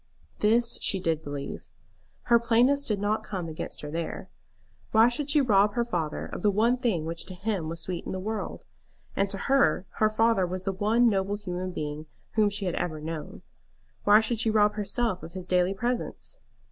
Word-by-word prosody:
This 230 +3 +2
she 195 - +1
did 165 -3 0
believe. 145 -2 -6 0.6
Her 235 -1 +5
plainness 245 +5 +3
did 210 -3 0
not 210 +2 0
come 185 -4 -4
against 160 -1 -6
her 150 - -6
there. 165 +1 -4 0.6
Why 225 +2 +7
should 275 +4 -3
she 295 0 +5
rob 205 -4 +3
her 240 - +2
father 170 -9 -3
of - - -7
the 210 - +3
one 225 +5 +2
thing 220 - 0
which 165 +1 -5
to 185 - -8
him 190 -4 -2
was 165 0 -3
sweet 180 -2 -3
in - - -3
the 185 - -3
world? 215 +3 -4 0.5
And 195 0 +1
to 195 - -3
her, 275 -5 +2
her 215 - +4
father 220 -3 +2
was 185 +1 -4
the 195 0 -1
one 220 +5 +3
noble 200 -2 +1
human 185 -3 -4
being 150 -2 -5 0.2
whom 215 -2 +3
she 205 0 -3
had 180 - -1
ever 155 -3 -2
known. 155 0 -6 0.6
Why 210 +1 +7
should 225 0 -1
she 225 - +3
rob 210 -1 +4
herself 210 -1 -1
of 165 - -10
his 185 -1 -5
daily 180 +1 +2
presence? 245 - -3
205 Hz, 195 wpm, -27 LUFS, 180-225 Hz, 0.6 s, Why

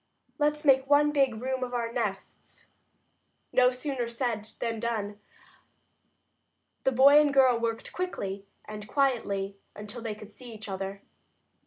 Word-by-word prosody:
"Let's 300 +1 +1
make 265 -1 +4
one 295 +1 +5
big 270 -6 +2
room 260 +1 -2
of 250 0 -4
our 235 -1 -2
nests." 210 -6 -5 0.9
No 250 -1 +6
sooner 255 -1 -3
said 230 -3 -3
than 230 -1 -2
done. 210 -3 -3 1.7
The 265 - +4
boy 280 +4 +7
and 295 -1 +2
girl 260 -4 +5
worked 230 -1 -3
quickly 200 - -4 0.2
and 210 -1 -8
quietly 200 -8 0 0.2
until 210 +3 -8
they 225 -2 -4
could 210 0 -13
see 245 -3 -11
each 215 0 -8
other. 195 0 -5
235 Hz, 140 wpm, -28 LUFS, 210-265 Hz, 1.7 s, boy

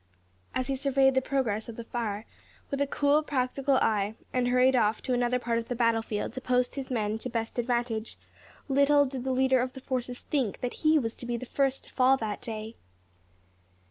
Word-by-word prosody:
As 255 - 0
he 275 - -1
surveyed 270 0 +3
the 260 - +3
progress 240 -6 -1
of 230 - -7
the 235 - -6
fire, 225 -2 -3 0.5
with 280 0 -1
a 280 - +2
cool, 285 +2 +3
practical 275 -1 0
eye, 215 -3 +1 0.2
and 250 -1 +1
hurried 255 +1 +4
off 215 -2 +2
to 255 - -1
another 245 0 +2
part 235 -2 -1
of 230 - -6
the 245 - -2
battle 230 -1 +2
field 210 -2 -3
to 260 - -5
post 250 -1 +1
his 270 -2 -5
men 220 -3 -1
to 250 - -4
best 230 0 -3
advantage, 235 -2 -1 0.5
little 285 +1 +4
did 260 -2 -5
the 265 - -1
leader 260 0 +3
of 255 0 -3
the - - -8
forces 250 -2 -3
think 260 -9 -1
that 245 - -2
he 310 0 +5
was 230 -6 -1
to 240 - -8
be 240 0 -1
the 255 - -6
first 270 +1 0
to - - -14
fall 260 +1 +4
that 220 -4 -4
day! 220 0 -6
250 Hz, 210 wpm, -28 LUFS, 230-265 Hz, 0.5 s, he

